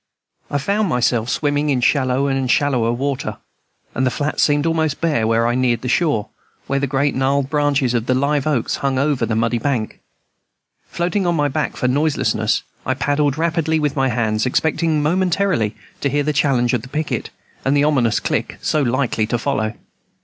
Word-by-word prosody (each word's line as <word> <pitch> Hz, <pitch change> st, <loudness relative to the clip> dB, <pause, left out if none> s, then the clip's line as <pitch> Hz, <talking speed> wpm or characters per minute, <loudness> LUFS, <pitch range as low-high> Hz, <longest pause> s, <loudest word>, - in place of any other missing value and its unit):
I 145 Hz, -, 0 dB
found 200 Hz, +7 st, 0 dB
myself 120 Hz, -3 st, +1 dB
swimming 145 Hz, +1 st, 0 dB
in 135 Hz, -3 st, +2 dB
shallow 130 Hz, +1 st, +2 dB
and 135 Hz, -2 st, -1 dB
shallower 125 Hz, -5 st, +2 dB
water, 135 Hz, +2 st, -3 dB, 0.6 s
and 130 Hz, -, -1 dB
the 130 Hz, -, +3 dB
flats 145 Hz, +3 st, -2 dB
seemed 145 Hz, 0 st, +2 dB
almost 160 Hz, -3 st, 0 dB
bare 145 Hz, -10 st, +1 dB
when 115 Hz, 0 st, +2 dB
I 120 Hz, +1 st, +1 dB
neared 120 Hz, -2 st, +1 dB
the 125 Hz, -, -4 dB
shore, 135 Hz, -5 st, +1 dB, 0.4 s
where 140 Hz, -, 0 dB
the 140 Hz, -, -1 dB
great 140 Hz, +2 st, +1 dB
gnarled 135 Hz, +1 st, 0 dB
branches 145 Hz, -4 st, +1 dB
of 115 Hz, -1 st, -1 dB
the 130 Hz, -, +2 dB
liveoaks 140 Hz, -1 st, 0 dB
hung 135 Hz, -1 st, -1 dB
far 135 Hz, +2 st, +1 dB
over 135 Hz, -6 st, 0 dB
the 115 Hz, -, -1 dB
muddy 115 Hz, +1 st, +1 dB
bank. 120 Hz, -4 st, -2 dB, 0.9 s
Floating 180 Hz, +2 st, -1 dB
on 170 Hz, -, +2 dB
my 145 Hz, -2 st, +1 dB
back 150 Hz, +2 st, -2 dB
for 125 Hz, -, 0 dB
noiselessness, 145 Hz, +4 st, +1 dB, 0.2 s
I -, -, -1 dB
paddled 145 Hz, 0 st, 0 dB
rapidly 165 Hz, -1 st, 0 dB
in 155 Hz, -, 0 dB
with 145 Hz, -2 st, 0 dB
my 135 Hz, -1 st, +1 dB
hands, 110 Hz, 0 st, 0 dB
expecting 160 Hz, +2 st, +1 dB
momentarily 180 Hz, -, +1 dB, 0.2 s
to 140 Hz, -, 0 dB
hear 145 Hz, +2 st, 0 dB
the 150 Hz, +1 st, 0 dB
challenge 135 Hz, -4 st, +2 dB
of 125 Hz, -, +1 dB
the -, -, -11 dB
picket, 155 Hz, +3 st, -3 dB, 0.3 s
and 135 Hz, +2 st, +2 dB
the 145 Hz, -, +3 dB
ominous 130 Hz, -7 st, +2 dB
click -, -, -2 dB
so 155 Hz, -, 0 dB
likely 125 Hz, -4 st, 0 dB
to 120 Hz, -, 0 dB
follow. 115 Hz, -3 st, -1 dB
140 Hz, 190 wpm, -19 LUFS, 125-150 Hz, 0.9 s, the